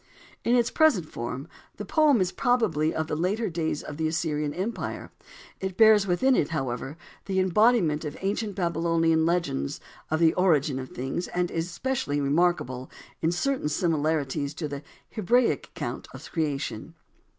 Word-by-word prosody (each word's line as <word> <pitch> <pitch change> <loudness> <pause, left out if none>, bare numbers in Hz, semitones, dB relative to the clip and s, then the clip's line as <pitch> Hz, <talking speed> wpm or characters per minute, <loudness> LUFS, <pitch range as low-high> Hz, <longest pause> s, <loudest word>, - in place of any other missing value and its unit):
In 240 - +3
its 240 -1 +2
present 275 - +3
form, 125 +4 -5 0.3
the - - -5
poem 300 - +4
is 180 -1 +1
probably 220 - +1
of 160 - -2
the 155 - -3
later 190 +6 -1
days 160 -2 -2
of 145 - -7
the 160 0 0
Assyrian 155 -2 -1
empire. 195 +9 -4 0.5
It 190 -1 -4
bears 215 -3 +6
within 255 +9 +3
it, 145 - +1
however, 135 -1 -3 0.3
the 190 -1 0
embodiment 185 -4 +3
of 150 -1 -5
ancient 200 +1 -2
Babylonian 165 -2 +1
legends 170 - -1 0.3
of 155 - 0
the 165 -1 +5
origin 150 -7 +2
of 130 -1 -7
things, 135 +8 -4
and 180 0 -1
is 165 +1 -2
specially 175 - -2
remarkable 140 -4 0 0.3
in 165 - +2
certain 255 - -1
similarities 150 -4 0
to 160 - -3
the 140 -1 -6 0.3
Hebraic 235 +4 +2
account - - -5
of - - -10
creation. 150 -5 -3
165 Hz, 155 wpm, -26 LUFS, 150-195 Hz, 0.5 s, bears